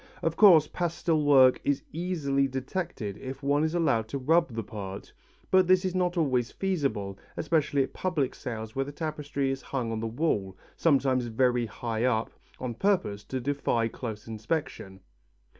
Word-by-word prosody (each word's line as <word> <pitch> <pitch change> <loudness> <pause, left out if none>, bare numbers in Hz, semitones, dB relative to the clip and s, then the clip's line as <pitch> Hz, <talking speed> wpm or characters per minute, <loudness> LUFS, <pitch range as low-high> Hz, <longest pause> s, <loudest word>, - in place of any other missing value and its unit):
Of 165 0 0
course 170 -7 +7
pastel 170 -2 -1
work 135 -3 +6
is 140 -1 0
easily 150 -5 0
detected 130 - -4
if 135 +1 -7
one 145 +2 +2
is 160 +2 0
allowed 135 -10 +1
to 140 - -4
rub 155 0 +2
the 115 - -2
part, 100 -2 -8 0.4
but 185 -1 +5
this 185 +1 +4
is 185 - -1
not 180 -1 0
always 130 -6 +1
feasible, 140 - -2 0.2
especially 150 -3 +1
at - - -7
public 160 -8 -1
sales 110 -2 -6
where 135 - +1
the 145 - -7
tapestry 145 -3 -2
is 135 - -4
hung 125 -4 -3
on 110 - -2
the 115 - -2
wall, 110 - -1 0.2
sometimes 130 -5 +2
very 120 0 +1
high 115 +1 -3
up, 115 -3 +1 0.3
on 125 -2 -3
purpose 180 - 0
to 130 - -3
defy 125 -3 0
close 110 -2 -6
inspection. 110 -4 -4
135 Hz, 165 wpm, -28 LUFS, 115-160 Hz, 0.4 s, course